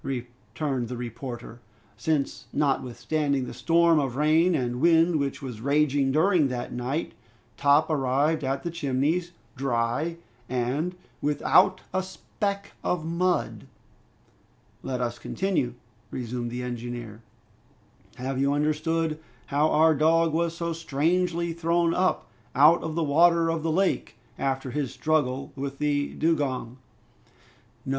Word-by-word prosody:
returned 125 Hz, +1 st, -4 dB
the 125 Hz, +1 st, -5 dB
reporter, 120 Hz, 0 st, -7 dB, 0.4 s
"since 140 Hz, +5 st, -1 dB
notwithstanding 140 Hz, 0 st, 0 dB
the -, -, -7 dB
storm 165 Hz, +5 st, +3 dB
of 135 Hz, -4 st, -2 dB
rain 160 Hz, +4 st, +3 dB
and 125 Hz, -2 st, -2 dB
wind 165 Hz, 0 st, +4 dB
which 140 Hz, 0 st, -3 dB
was 120 Hz, -5 st, -6 dB
raging 140 Hz, 0 st, +2 dB
during 160 Hz, +1 st, +3 dB
that 125 Hz, -2 st, -4 dB
night, 125 Hz, +6 st, -3 dB, 0.4 s
Top 145 Hz, +2 st, +4 dB
arrived 145 Hz, +1 st, +1 dB
at 135 Hz, +1 st, -1 dB
the 170 Hz, -, -3 dB
Chimneys, 160 Hz, +3 st, 0 dB, 0.2 s
dry 135 Hz, +5 st, -1 dB, 0.3 s
and 130 Hz, +8 st, -1 dB, 0.3 s
without 150 Hz, +5 st, +3 dB
a 185 Hz, -, +1 dB
speck 200 Hz, +2 st, -4 dB
of 170 Hz, -3 st, -1 dB
mud!" 175 Hz, +2 st, -1 dB, 1.1 s
"Let 125 Hz, -1 st, -3 dB
us 120 Hz, -1 st, -2 dB
continue," 180 Hz, -11 st, -1 dB, 0.3 s
resumed 120 Hz, -1 st, -4 dB
the 125 Hz, +1 st, -4 dB
engineer. 120 Hz, -2 st, -6 dB, 0.9 s
"Have 130 Hz, +1 st, -3 dB
you 140 Hz, +1 st, +2 dB
understood 155 Hz, +2 st, 0 dB, 0.3 s
how 145 Hz, +2 st, +2 dB
our 160 Hz, +1 st, +5 dB
dog 160 Hz, +2 st, +3 dB
was 170 Hz, 0 st, 0 dB
so 170 Hz, -1 st, -2 dB
strangely 165 Hz, +2 st, 0 dB
thrown 170 Hz, 0 st, +1 dB
up 185 Hz, +1 st, +1 dB, 0.3 s
out 150 Hz, +6 st, +6 dB
of 160 Hz, -1 st, -4 dB
the 165 Hz, -, +1 dB
water 165 Hz, +3 st, +4 dB
of 165 Hz, -1 st, -2 dB
the 160 Hz, 0 st, -1 dB
lake, 185 Hz, -, 0 dB, 0.2 s
after 135 Hz, -1 st, -1 dB
his 140 Hz, -1 st, -2 dB
struggle 140 Hz, -4 st, 0 dB
with 140 Hz, 0 st, -5 dB
the 145 Hz, -1 st, 0 dB
dugong?" 135 Hz, -6 st, -1 dB, 1.1 s
"No! -, -, -5 dB
145 Hz, 130 wpm, -26 LUFS, 130-165 Hz, 1.1 s, out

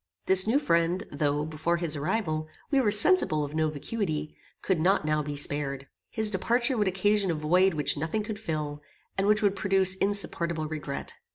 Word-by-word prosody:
This 190 Hz, +1 st, +5 dB
new 235 Hz, +5 st, +3 dB
friend, 170 Hz, -, 0 dB
though, 145 Hz, 0 st, -1 dB
before 160 Hz, +2 st, -2 dB
his 170 Hz, -3 st, -1 dB
arrival, 155 Hz, 0 st, -2 dB, 0.2 s
we 275 Hz, -2 st, +3 dB
were 220 Hz, -, +1 dB
sensible 205 Hz, -, +5 dB
of 145 Hz, 0 st, -6 dB
no 155 Hz, 0 st, 0 dB
vacuity, 155 Hz, -1 st, -4 dB, 0.3 s
could 190 Hz, -4 st, 0 dB
not 180 Hz, 0 st, +1 dB
now 155 Hz, 0 st, 0 dB
be 145 Hz, 0 st, -6 dB
spared. 140 Hz, -1 st, -3 dB, 0.2 s
His 220 Hz, -1 st, +1 dB
departure 235 Hz, +6 st, 0 dB
would 210 Hz, -3 st, 0 dB
occasion 195 Hz, +1 st, +1 dB
a 165 Hz, -, 0 dB
void 175 Hz, +4 st, +2 dB
which 150 Hz, 0 st, +3 dB
nothing 160 Hz, +8 st, -2 dB
could 210 Hz, -1 st, -6 dB
fill, 150 Hz, -7 st, -5 dB, 0.3 s
and 195 Hz, +1 st, -1 dB
which 210 Hz, +1 st, +2 dB
would 200 Hz, -1 st, +2 dB
produce 190 Hz, -1 st, +2 dB
insupportable 170 Hz, -5 st, -1 dB
regret. 150 Hz, -3 st, -6 dB
170 Hz, 180 wpm, -27 LUFS, 155-205 Hz, 0.3 s, This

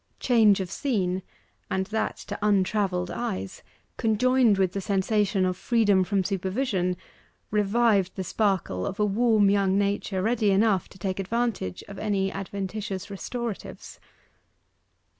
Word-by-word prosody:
Change 220 Hz, -5 st, +4 dB
of 185 Hz, -1 st, -5 dB
scene 190 Hz, -9 st, -1 dB, 0.5 s
and 190 Hz, 0 st, 0 dB
that 220 Hz, +3 st, -2 dB
to -, -, -7 dB
untravelled 195 Hz, -3 st, +1 dB
eyes 95 Hz, -, -4 dB, 0.4 s
conjoined 230 Hz, 0 st, +3 dB
with 190 Hz, -2 st, +2 dB
the 195 Hz, -, -3 dB
sensation 195 Hz, 0 st, +1 dB
of 185 Hz, 0 st, 0 dB
freedom 205 Hz, -3 st, +2 dB
from 195 Hz, +1 st, 0 dB
supervision, 190 Hz, -1 st, -1 dB, 0.5 s
revived 210 Hz, -2 st, +2 dB
the 190 Hz, -, -3 dB
sparkle 185 Hz, -, -1 dB
of 195 Hz, -, -5 dB
a 210 Hz, -, +3 dB
warm 210 Hz, -1 st, +3 dB
young 195 Hz, -1 st, +2 dB
nature 200 Hz, -1 st, -1 dB
ready 220 Hz, -1 st, +2 dB
enough 195 Hz, -1 st, +2 dB
to -, -, -15 dB
take 190 Hz, +1 st, -3 dB
advantage 210 Hz, -, -2 dB
of 200 Hz, -1 st, -9 dB
any 195 Hz, -3 st, 0 dB
adventitious 195 Hz, 0 st, -5 dB
restoratives. 230 Hz, +2 st, -6 dB
200 Hz, 130 wpm, -26 LUFS, 190-215 Hz, 0.5 s, Change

